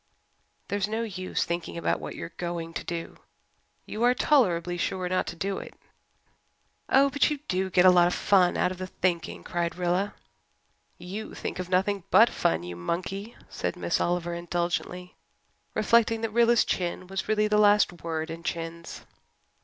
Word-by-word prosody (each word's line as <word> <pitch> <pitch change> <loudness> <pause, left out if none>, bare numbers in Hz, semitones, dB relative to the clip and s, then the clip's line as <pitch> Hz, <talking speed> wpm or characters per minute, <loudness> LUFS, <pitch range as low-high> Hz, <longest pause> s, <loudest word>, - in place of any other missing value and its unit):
"There's 200 0 0
no 220 +2 -2
use 185 -4 -2
thinking 170 0 -4
about 170 - 0
what - - -7
you're 165 - -7
going 170 -1 -4
to - - -4
do 170 -1 -5 0.7
you 215 - -6
are 245 +1 +4
tolerably 180 - +2
sure 185 +1 -2
not 185 +1 0
to - - -5
do 195 +3 -2
it." - - -10 1.1
"Oh, 275 +1 +5
but 285 - +3
you 300 - -2
do 190 +1 0
get 180 0 +4
a 185 - +9
lot 175 -1 +5
of 180 - -1
fun 185 -3 +3
out 180 - +2
of 185 - -7
the 185 - -4
thinking," 175 -2 -2
cried 170 -1 -2
Rilla. 180 +3 0 0.8
"You 190 +5 -7
think - - -5
of 180 -1 -4
nothing 190 +1 +1
but 225 +6 +6
fun, 85 +1 0
you 90 0 -6
monkey," 185 - -4
said - - -3
Miss - - -1
Oliver 175 0 0
indulgently, 175 +1 -3 0.6
reflecting 225 +1 +3
that 225 -1 -2
Rilla's 235 0 +4
chin 180 0 -2
was 190 -1 -4
really 215 0 +3
the 210 0 +2
last 205 -4 +4
word 160 -1 -3
in 165 +1 -7
chins. 170 0 -5
180 Hz, 170 wpm, -27 LUFS, 170-210 Hz, 1.1 s, a